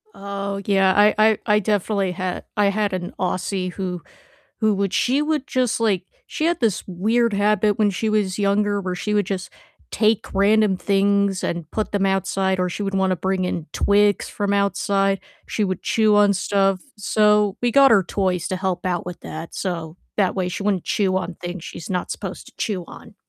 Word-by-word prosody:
Oh, 200 0 -4
yeah, 195 -2 +3
I 210 +1 +5
I 215 0 +4
I 210 0 +3
definitely 200 -1 0
had 185 0 -4
I 205 - +3
had 205 0 0
an 180 -1 -4
Aussie 185 0 -2
who 180 -3 -4 0.6
who 215 -1 +3
would 195 -1 -1
she 265 +4 +2
would 300 -2 -1
just, 250 -3 0
like 200 -5 +1 0.2
she 310 - -2
had 345 +1 +1
this 225 -6 0
weird 220 +5 +1
habit 210 0 +2
when 210 -1 +4
she 215 +3 -2
was 205 -3 0
younger 205 0 +1
where 185 -1 -3
she 210 +3 -3
would 205 -2 +2
just 190 -1 -4 0.4
take 220 -1 +1
random 205 0 +3
things 200 0 +1
and 170 -2 -3
put 215 - -2
them 200 -1 +1
outside, 190 0 0
or 180 - +1
she 205 - -4
would 195 0 -3
wanna 190 -1 +1
bring 190 +1 -1
in 170 -3 -3
twigs 205 0 +2
from 200 -1 -1
outside, 195 0 +1 0.3
she 215 - -1
would 185 -2 -2
chew 215 -2 +2
on 205 -1 +5
stuff, 195 0 +1 0.2
so 210 0 +2
we 240 0 +1
got 275 +2 +6
her 205 -4 +5
toys 185 -2 -1
to 185 - -2
help 185 -1 -2
out 180 -2 -1
with 180 -1 -7
that, 160 +1 -8
so 170 -3 -4 0.2
that 195 -3 +2
way 185 -2 -1
she 180 - -5
wouldn't 200 -3 0
chew 195 -6 +1
on 185 -2 -4
things 175 0 -7
she's 165 - -8
not 180 -2 -2
supposed - - -6
to - - -14
chew 195 -5 -2
on. - - -13
200 Hz, 195 wpm, -22 LUFS, 185-210 Hz, 0.6 s, got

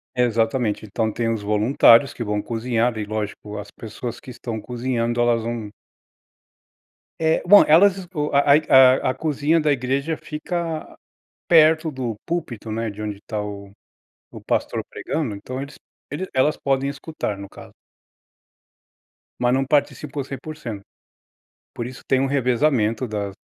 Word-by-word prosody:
Exatamente. 115 -2 0
Então 110 +2 -1
tem 115 0 -1
os 110 - -4
voluntários 115 +5 +4
que 120 - -5
vão 105 -1 -1
cozinhar, 120 +1 -1
e - - -2
lógico 105 0 -5
as 105 - -8
pessoas 115 +2 -7
que - - -13
estão 115 -3 -6
cozinhando 120 -1 -2
elas 120 -1 +3
vão 115 -2 -5 1.5
É, 160 0 +1
bom, 200 +3 +8
elas 185 +5 +6
esco 170 -5 -4
a 140 +1 +3
ai 150 +2 +6
a 130 -1 +6
a - - -5
cozinha 150 +3 +1
da 150 - +2
igreja 140 +4 -1
fica 165 +1 -5 0.5
perto 160 -1 +5
do 125 -5 -4
púlpito, 120 -10 -4
né, 115 +1 -2
de 105 +1 -8
onde 105 -2 -4
tá 105 -2 -3
o 100 -1 -7 0.6
o - - -10
pastor - - -1
pregando, 130 -11 -3
então 130 +6 -6
eles 140 +1 -9 0.6
elas 145 +4 +2
podem 135 0 0
escutar, 140 -7 -5
no 100 0 -8
caso. - - -13 1.7
Mas 125 0 +2
não 135 +1 +1
participam 145 0 -1
100%. 135 -5 -7 0.9
Por 120 - -4
isso 125 0 -10
tem 130 - +3
um 135 - +2
revezamento 125 -3 +1
das 105 -3 -4
125 Hz, 145 wpm, -22 LUFS, 110-145 Hz, 1.7 s, bom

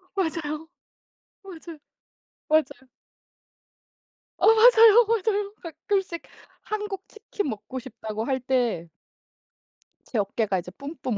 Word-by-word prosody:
맞아요. 320 -3 -2 0.8
맞아요. 335 -4 -10 0.7
맞아요. 310 0 +6 1.8
어. - - +3
맞아요, 450 0 +7
맞아요. 415 -2 0
가끔씩 340 +1 -3 0.4
한국 415 -2 -5
치킨 420 -6 -5
먹고 235 +4 -6
싶다고 220 -4 -6
할 260 0 0
때 240 -9 0 1.2
제 230 - -2
어깨가 200 -1 0
이제 180 - -8
뿜뿜 280 -6 -4
320 Hz, 205 characters per minute, -25 LUFS, 255-410 Hz, 1.8 s, 맞아요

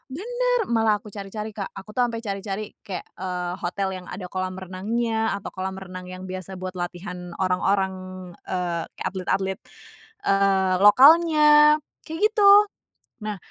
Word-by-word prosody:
Bener. 485 +4 -1
Malah 225 -3 +2
aku 210 - -11
cari-cari 210 +2 -6
Kak. 200 -2 -5
Aku 195 +2 -10
tuh 250 -1 +3
ampe 230 -1 -4
cari-cari 200 0 -4 0.2
kayak, 185 -4 -4 0.2
eee, 180 -1 -3
hotel 190 +2 -2
yang 180 - -11
ada 180 0 -7
kolam 185 0 -3
renangnya 220 +5 -1
atau 200 0 -5
kolam 190 0 -5
renang 185 -1 -8
yang 185 +1 -8
biasa 185 0 -6
buat 185 0 -5
latihan 180 0 -6
orang-orang, 190 +1 +1 0.5
eee, 175 -2 -2
kayak - - -3
atlet-atlet, 190 +1 -2 0.7
eee, 195 -1 +3
lokalnya 300 +5 +7 0.3
kayak 320 +1 -6
gitu. 410 -2 +6 0.7
Nah 210 -2 -3
195 Hz, 140 wpm, -24 LUFS, 185-225 Hz, 0.7 s, lokalnya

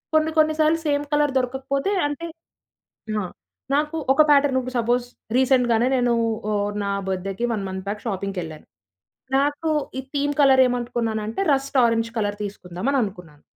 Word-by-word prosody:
కొన్ని 315 0 +3
కొన్ని 310 0 +4
సార్లు 310 +1 +3
సేమ్ 290 0 +1
కలర్ 295 -2 +2
దొరకకపోతే 270 +6 -2 0.2
అంటే 335 +4 -5 0.9
ఆ! - - -3 0.5
నాకు 300 +2 0 0.2
ఒక 310 - +5
ప్యాటర్న్ 280 -2 +4
ఇప్పుడు 255 0 -7
సపోజ్ 240 +1 +1 0.3
రీసెంట్‌గానే 250 -2 +3
నేను 245 -1 +2 0.4
ఆహ్, 205 0 0
నా 200 - -1 0.2
బర్త్‌డేకి 195 +4 -2
1 205 -3 -3
మంత్ 190 0 -6
బ్యాక్ 210 +1 -4
షాపింగ్‌కెళ్ళాను. 185 -6 -4 0.7
నాకు 290 +3 0 0.3
ఈ - - -9
theme 290 +1 0
colour 265 -1 +6
ఏమనుకున్నానంటే 230 - -2
rust 275 0 -1
orange 230 0 +1
colour 205 -1 -1
తీసుకుందాం 185 -1 -6
అని 275 - +2
అనుకున్నాను. 180 -7 -7
245 Hz, 145 wpm, -23 LUFS, 205-280 Hz, 0.9 s, కలర్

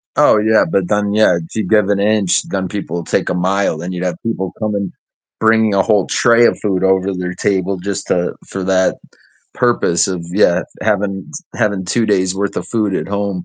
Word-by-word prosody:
Oh, - - +5
yeah, 110 +1 +3
but 95 -2 0
then 105 -1 0
yeah, 110 -4 +4
if 80 -1 -9
you 110 - 0
give 105 -2 +3
an 100 - +1
inch, 100 -3 +2
then 95 -1 -2
people 85 -4 -4
take - - -1
a - - 0
mile, 95 0 0
then 85 +3 -6
you'd 90 0 -4
have 90 - -2
people 95 -5 -2
come 110 -1 -1
and 100 -2 -3 0.5
bringing 110 -1 +3
a 95 - +3
whole 105 -3 +2
tray 120 0 +4
of - - +2
food 95 -3 -1
over 95 0 +2
their 90 0 -4
table 95 0 -1
just 100 +2 -5
to 90 0 0
for 95 - -5
that 95 -1 +2 0.6
purpose 120 -8 +1
of 90 -3 -4
yeah, 90 -3 +3 0.2
having 100 -3 -1 0.2
having 100 -3 -1
2 115 +5 0
days 95 -2 +1
worth 100 +1 -3
of - - -3
food 105 -4 0
at - - -3
home. 100 -3 -3
100 Hz, 205 wpm, -16 LUFS, 90-105 Hz, 0.6 s, Oh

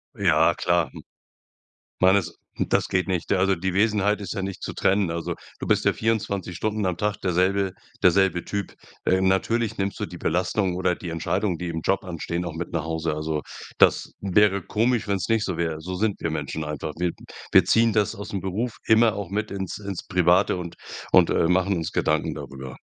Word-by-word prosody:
Ja, - - +4
klar, - - +1
hm. - - -10 1.0
Man 95 +2 +6
ist 85 -4 -2 0.2
das - - +1
geht 90 0 0
nicht. 90 -3 -2
Da 100 - +3
also 95 0 +3
die 90 +1 -2
Wesenheit 105 0 +2
ist 95 -3 -5
ja - - -3
nicht 95 -1 -5
zu - - -4
trennen. 100 -2 +2
Also 85 0 -3 0.2
du - - -5
bist - - +2
ja - - +4
24 105 -5 -1
Stunden 105 +3 -1
am 90 -2 0
Tag 105 +2 -1
derselbe 95 +1 +1 0.3
derselbe 95 -1 +3
Typ. 100 -1 -4 0.3
Äh, 95 0 +3
natürlich 105 +4 +1
nimmst 100 0 -2
du - - -2
die - - -10
Belastung 90 +2 0
oder 90 -1 +1
die 85 - -8
Entscheidung, 90 +3 -1
die 90 - -4
im 80 -1 -3
Job 95 +5 0
anstehen, 85 -1 -4
auch 85 - -4
mit 85 +1 -5
nach 85 -2 -1
Hause. 80 -1 -2
Also, 75 0 -2 0.4
das - - +4
wäre 100 0 +3
komisch, 115 +3 0
wenn's 95 -3 -1
nicht 115 -2 +2
so 95 - -2
wäre. 80 -2 -2
So 90 +3 -5
sind 105 +1 0
wir - - -1
Menschen 80 - -3
einfach. 75 0 -4
Wir 90 0 +1 0.4
wir - - +6
ziehen 115 0 +4
das 105 -2 +1
aus 100 +1 -8
'm 100 - -2
Beruf 105 +6 -3
immer 110 0 +5
auch 100 -1 -5
mit 105 +2 -2
ins 95 -2 -4
ins 100 -3 -6
Private 90 -2 +3
und 85 -2 -6 0.3
und, - - +6
äh, 80 - +2
machen 95 +2 +2
uns 80 -1 -3
Gedanken - - 0
darüber. 65 -2 -8
95 Hz, 205 wpm, -24 LUFS, 85-100 Hz, 1.0 s, Man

